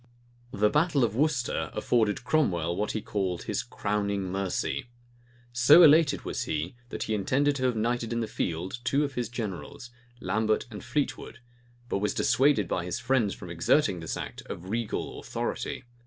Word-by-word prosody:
[*] 120 Hz, 0 st, -32 dB
The 105 Hz, -2 st, +2 dB
battle 150 Hz, -2 st, +2 dB
of 110 Hz, -2 st, 0 dB
Worcester, 140 Hz, -3 st, 0 dB
afforded 110 Hz, -2 st, +1 dB
Cromwell 90 Hz, -, +1 dB
what 105 Hz, +2 st, -1 dB
he 110 Hz, -, -3 dB
called 95 Hz, -4 st, -2 dB
his -, -, -1 dB
"crowning 100 Hz, -2 st, -2 dB
mercy."[] 95 Hz, +4 st, -2 dB, 0.7 s
So 145 Hz, +8 st, +8 dB
elated 155 Hz, -1 st, +5 dB
was -, -, -3 dB
he, 80 Hz, +7 st, -3 dB
that -, -, -4 dB
he 110 Hz, -, -2 dB
intended 135 Hz, +8 st, +1 dB
to 130 Hz, -, -1 dB
have 125 Hz, -2 st, +1 dB
knighted 115 Hz, +1 st, -1 dB
in 115 Hz, -, 0 dB
the 115 Hz, -, 0 dB
field 90 Hz, 0 st, -3 dB
two 140 Hz, +3 st, +2 dB
of 140 Hz, -2 st, -3 dB
his 120 Hz, -3 st, -2 dB
generals, 115 Hz, +1 st, -6 dB, 0.3 s
Lambert 110 Hz, +2 st, 0 dB
and 105 Hz, -3 st, -8 dB
Fleetwood; 145 Hz, -5 st, -2 dB, 0.5 s
but 100 Hz, -, -1 dB
was 105 Hz, +1 st, -1 dB
dissuaded 135 Hz, -8 st, +3 dB
by 90 Hz, -, -1 dB
his 90 Hz, 0 st, -3 dB
friends 120 Hz, -5 st, +1 dB
from 90 Hz, -3 st, -9 dB
exerting 90 Hz, -, +2 dB
this 80 Hz, -, -4 dB
act -, -, -6 dB
of 90 Hz, +2 st, -7 dB
regal 115 Hz, -1 st, -3 dB
authority. -, -, -4 dB
110 Hz, 170 wpm, -28 LUFS, 95-130 Hz, 0.7 s, So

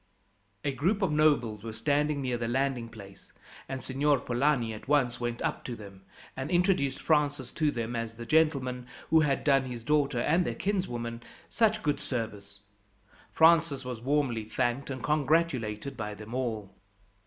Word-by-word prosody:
A 140 Hz, -, 0 dB
group 180 Hz, -, 0 dB
of 185 Hz, -, +2 dB
nobles 140 Hz, -9 st, +2 dB
were 115 Hz, -, -5 dB
standing 145 Hz, +3 st, 0 dB
near 125 Hz, -2 st, -1 dB
the 120 Hz, -1 st, -2 dB
landing 130 Hz, -1 st, 0 dB
place, 100 Hz, -3 st, -13 dB, 0.4 s
and 135 Hz, -1 st, -4 dB
Signor 140 Hz, +1 st, +2 dB
Polani 125 Hz, -2 st, +1 dB
at 105 Hz, -, -10 dB
once 130 Hz, -4 st, +2 dB
went 120 Hz, -1 st, -3 dB
up -, -, -2 dB
to 120 Hz, -, -4 dB
them, 100 Hz, -3 st, -12 dB, 0.3 s
and 135 Hz, +2 st, -4 dB
introduced 175 Hz, -7 st, +2 dB
Francis 145 Hz, -4 st, +1 dB
to 155 Hz, -2 st, +1 dB
them 120 Hz, -3 st, -3 dB
as 115 Hz, -1 st, -3 dB
the 115 Hz, +1 st, -8 dB
gentleman 135 Hz, -5 st, +1 dB, 0.2 s
who 160 Hz, -, +7 dB
had 145 Hz, -3 st, +1 dB
done 135 Hz, -2 st, +3 dB
his 120 Hz, -3 st, -6 dB
daughter 140 Hz, -2 st, +1 dB
and 165 Hz, +8 st, +3 dB
their -, -, -3 dB
kinswoman 120 Hz, -, -2 dB, 0.3 s
such 220 Hz, -1 st, +2 dB
good 145 Hz, -1 st, +1 dB
service. 100 Hz, -5 st, -5 dB, 0.7 s
Francis 160 Hz, -4 st, +4 dB
was 125 Hz, -3 st, -5 dB
warmly 130 Hz, -4 st, 0 dB
thanked 120 Hz, +5 st, -1 dB
and 130 Hz, -3 st, -5 dB
congratulated 140 Hz, -6 st, 0 dB
by 105 Hz, -3 st, -5 dB
them 110 Hz, +2 st, -10 dB
all. 110 Hz, -6 st, -3 dB
130 Hz, 165 wpm, -29 LUFS, 115-150 Hz, 0.7 s, who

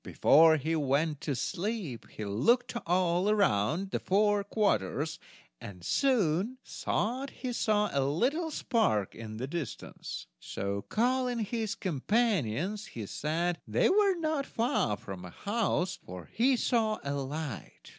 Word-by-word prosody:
Before 160 Hz, +1 st, +5 dB
he 160 Hz, +3 st, -1 dB
went 145 Hz, +1 st, 0 dB
to 145 Hz, -, -2 dB
sleep 175 Hz, -, -3 dB
he 110 Hz, -, -6 dB
looked 135 Hz, -, +2 dB
all 180 Hz, +2 st, +2 dB
round 165 Hz, -, +1 dB
the -, -, 0 dB
four 205 Hz, +1 st, +2 dB
quarters, 180 Hz, -7 st, 0 dB, 0.4 s
and 90 Hz, -3 st, -10 dB
soon 225 Hz, -, +2 dB
thought 255 Hz, +6 st, -2 dB
he 255 Hz, -2 st, -5 dB
saw 210 Hz, -2 st, +1 dB
a 140 Hz, -, +2 dB
little 255 Hz, -, 0 dB
spark 220 Hz, -, +1 dB
in 110 Hz, -1 st, -8 dB
the 125 Hz, -, -3 dB
distance; 150 Hz, -3 st, -6 dB
so, 100 Hz, +9 st, -3 dB
calling 250 Hz, -, 0 dB
his 220 Hz, 0 st, -2 dB
companions, 190 Hz, -, 0 dB
he 110 Hz, -, -3 dB
said 165 Hz, -, -1 dB
they 110 Hz, -, +3 dB
were 400 Hz, -1 st, +4 dB
not 310 Hz, -4 st, -1 dB
far 225 Hz, -, 0 dB
from 95 Hz, -2 st, -8 dB
a 90 Hz, -, -8 dB
house, 200 Hz, -, -1 dB
for 90 Hz, -1 st, -9 dB
he 255 Hz, +4 st, +3 dB
saw 225 Hz, -3 st, +1 dB
a 140 Hz, -, -2 dB
light. 140 Hz, -1 st, -5 dB
180 Hz, 135 wpm, -30 LUFS, 135-230 Hz, 0.4 s, Before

